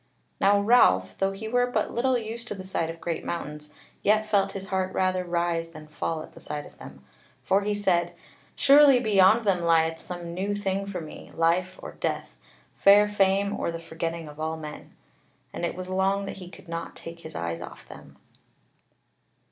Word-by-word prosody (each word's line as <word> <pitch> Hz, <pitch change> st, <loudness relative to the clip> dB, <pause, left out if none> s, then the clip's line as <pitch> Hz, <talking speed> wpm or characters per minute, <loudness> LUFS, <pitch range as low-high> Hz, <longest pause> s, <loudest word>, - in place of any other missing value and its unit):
Now 200 Hz, +1 st, +4 dB
Ralph, 200 Hz, -, +4 dB
though 195 Hz, 0 st, +2 dB
he 200 Hz, +3 st, -7 dB
were 245 Hz, +2 st, +2 dB
but 245 Hz, -, -1 dB
little 255 Hz, +2 st, +2 dB
used 230 Hz, +1 st, -6 dB
to 210 Hz, -, -4 dB
the 190 Hz, -, -8 dB
sight 175 Hz, -3 st, -2 dB
of 165 Hz, 0 st, -7 dB
great 170 Hz, -1 st, -3 dB
mountains, 150 Hz, -3 st, -5 dB, 0.3 s
yet 215 Hz, +1 st, +3 dB
felt 200 Hz, -2 st, +1 dB
his 195 Hz, 0 st, -7 dB
heart 190 Hz, -1 st, -1 dB
rather 185 Hz, -1 st, +1 dB
rise 170 Hz, -1 st, -1 dB
than 155 Hz, -2 st, -11 dB
fall 155 Hz, +1 st, -3 dB
at -, -, -13 dB
the -, -, -14 dB
sight 145 Hz, 0 st, -5 dB
of -, -, -16 dB
them; 70 Hz, 0 st, -12 dB, 0.4 s
for 195 Hz, +1 st, +2 dB
he 205 Hz, +1 st, -1 dB
said: 185 Hz, -4 st, +1 dB, 0.4 s
"Surely 280 Hz, -2 st, +7 dB
beyond 215 Hz, 0 st, +4 dB
them 190 Hz, -3 st, +2 dB
lieth 165 Hz, -1 st, +2 dB
some 175 Hz, -1 st, -6 dB
new 195 Hz, +3 st, -2 dB
thing 195 Hz, -1 st, -2 dB
for 185 Hz, -3 st, -4 dB
me, 155 Hz, -, -10 dB
life 180 Hz, +3 st, +1 dB
or -, -, -6 dB
death: -, -, -4 dB, 0.4 s
fair 205 Hz, +1 st, +6 dB
fame 200 Hz, 0 st, +2 dB
or -, -, -1 dB
the 165 Hz, -, -5 dB
forgetting 165 Hz, 0 st, -5 dB
of 150 Hz, 0 st, -12 dB
all 160 Hz, +1 st, -2 dB
men." 150 Hz, -1 st, -9 dB, 0.6 s
And -, -, -5 dB
it -, -, -6 dB
was 185 Hz, 0 st, -6 dB
long 190 Hz, +1 st, +1 dB
that 195 Hz, -, -6 dB
he 180 Hz, -2 st, -9 dB
could 185 Hz, -, -15 dB
not 165 Hz, 0 st, -5 dB
take 165 Hz, 0 st, -9 dB
his 160 Hz, -1 st, -11 dB
eyes 85 Hz, 0 st, -3 dB
off -, -, -10 dB
them. -, -, -13 dB
185 Hz, 195 wpm, -26 LUFS, 165-200 Hz, 0.6 s, Surely